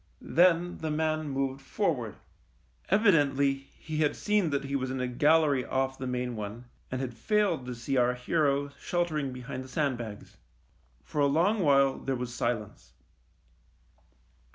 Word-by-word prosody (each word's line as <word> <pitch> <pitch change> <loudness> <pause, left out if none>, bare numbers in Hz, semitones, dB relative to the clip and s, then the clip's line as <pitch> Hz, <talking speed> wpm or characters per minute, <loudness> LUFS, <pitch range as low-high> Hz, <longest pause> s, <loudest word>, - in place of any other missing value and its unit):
Then 175 +1 +4
the 160 - -3
man 155 0 0
moved 135 0 -2
forward. 135 - -1 0.7
Evidently 145 -10 +4
he 135 +3 -8
had 150 -1 +2
seen 210 -5 +1
that 140 -1 -1
he 140 0 -3
was 130 -1 -1
in 130 0 -3
a 125 - 0
gallery 145 +1 +3
off 135 +1 -1
the 130 - -4
main 125 -1 -2
one, 110 +3 -6 0.2
and 130 - -3
had 130 -2 -3
failed 170 - 0
to 125 - -4
see 130 +3 -2
our 125 0 +3
hero 140 +2 +1
sheltering 155 -6 -1
behind 125 +1 -6
the - - -11
sandbags. 120 -8 -3 0.7
For 150 - -2
a 140 - +5
long 175 +10 +2
while 140 -5 +4
there 135 - -2
was 125 -1 -4
silence. 120 -4 -3
140 Hz, 155 wpm, -29 LUFS, 125-155 Hz, 0.7 s, a